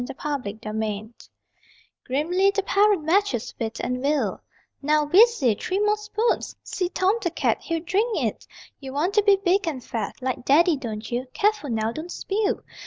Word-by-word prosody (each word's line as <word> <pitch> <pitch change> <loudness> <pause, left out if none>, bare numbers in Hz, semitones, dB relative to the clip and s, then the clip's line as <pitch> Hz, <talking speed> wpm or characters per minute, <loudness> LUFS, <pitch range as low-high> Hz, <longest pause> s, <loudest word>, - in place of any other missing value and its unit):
THE 245 - -7
HIGH 275 -9 -3
CHAIR 215 0 -3 1.0
Grimly 345 +9 +2
the 400 0 0
parent 405 -4 +3
matches 320 - +1
wit 225 -1 -3
and 250 +1 -2
will: 290 +2 0 0.4
Now, 300 +1 +2
Weesy, 360 - +5
three 370 - -1
more 420 +1 +3
spoons! 425 +2 -1
See 360 -2 -2
Tom 385 +5 +1
the 345 - 0
cat, 340 - 0
He'd 330 0 -3
drink 400 +7 +1
it. - - -2 0.3
You 265 -2 -8
want 325 +8 0
to 420 - +5
be 405 -1 +6
big 385 -1 +1
and 270 -6 -3
fat 225 -1 -4
Like 255 -1 -3
Daddy, 320 +5 +4
don't 225 -5 -6
you? 245 +2 -2
(Careful 420 -8 +1
now, 220 -1 0
don't 315 +7 -7
spill!) 420 +5 -1
320 Hz, 175 wpm, -24 LUFS, 255-400 Hz, 1.0 s, be